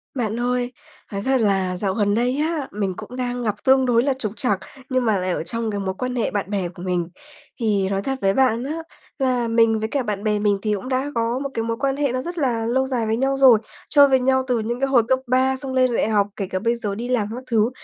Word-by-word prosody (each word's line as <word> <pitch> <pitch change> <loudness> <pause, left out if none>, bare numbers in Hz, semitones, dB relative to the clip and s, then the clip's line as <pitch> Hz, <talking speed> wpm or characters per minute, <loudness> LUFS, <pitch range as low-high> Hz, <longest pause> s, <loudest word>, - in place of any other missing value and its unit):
Bạn 230 -2 -2
ơi, 245 0 0 0.4
nói 200 -1 -3
thật 265 -2 +2
là 190 -3 +1
dạo 190 0 -1
gần 205 -1 +1
đây 245 +3 +1
á, 310 -3 -1
mình 200 -2 -2
cũng 250 - -8
đang 245 -1 -3
gặp 210 -3 0
tương 265 0 +4
đối 240 -1 +3
là 275 0 +2
trục 245 -6 -4
trặc, 205 -7 0 0.3
nhưng 255 -2 +1
mà 220 - +3
lại 185 0 -1
ở 170 - -2
trong 230 +2 -3
cái 205 - -3
mối 190 -1 -2
quan 255 0 -3
hệ 235 - 0
bạn 200 -2 -2
bè 195 -4 -1
của 175 - -12
mình. 180 -2 -1 0.5
Thì 205 -4 +1
nói 195 0 -1
thật 270 +6 -2
với 195 0 +3
bạn 250 -2 +2
á, 310 +5 -4 0.4
là 250 -3 +1
mình 225 -1 +3
với 220 - -1
cả 275 0 -1
bạn 210 -3 -3
bè 210 -1 +1
mình 205 -1 +2
thì 215 0 0
cũng 205 +5 -4
đã 265 +2 -1
có 230 +2 0
một 275 0 -3
cái 225 - -1
mối 230 0 -2
quan 270 0 0
hệ 285 -3 +1
nó 255 +1 -1
rất 345 +5 -6
là 240 -7 0
lâu 260 +3 +1
dài 245 -4 -1
với 220 +1 +1
nhau 270 +2 +1
rồi, 260 -5 +7 0.3
chơi 285 -1 +7
với 265 -1 +3
nhau 260 +1 +2
từ 245 -2 +1
những 235 +3 -3
cái 275 - +1
hồi 255 -4 +4
cấp 260 +1 +2
3 260 +1 +2
xong 265 -1 -5
lên 255 -2 +2
đại 220 - +1
học, 205 -2 +2
kể 195 - -3
cả 185 - -2
bây 230 +4 +1
giờ 210 -4 -3
đi 235 +4 -4
làm 235 -5 +1
các 255 - -7
thứ 225 0 +3
235 Hz, 275 wpm, -22 LUFS, 210-260 Hz, 0.5 s, rồi